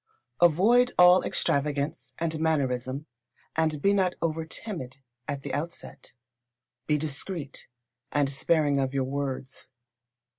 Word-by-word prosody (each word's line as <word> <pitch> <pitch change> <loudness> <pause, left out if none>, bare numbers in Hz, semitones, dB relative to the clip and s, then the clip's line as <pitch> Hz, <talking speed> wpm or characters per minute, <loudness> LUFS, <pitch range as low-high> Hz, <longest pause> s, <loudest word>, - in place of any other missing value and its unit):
Avoid 215 +10 +5
all 180 +1 +8
extravagance 140 -2 -1
and 160 -1 -2
mannerism, 135 -3 0 0.5
and 155 -2 +1
be 200 - +4
not 185 -2 +2
over 160 -1 -2
timid 155 - -6 0.3
at 140 -2 -4
the - - -5
outset. 155 -4 -6 0.7
Be 150 - +3
discreet 150 0 -4 0.4
and 145 -1 +2
sparing 145 0 +2
of 135 0 -1
your 135 - +2
words. 135 -1 -4
150 Hz, 115 wpm, -27 LUFS, 140-170 Hz, 0.7 s, all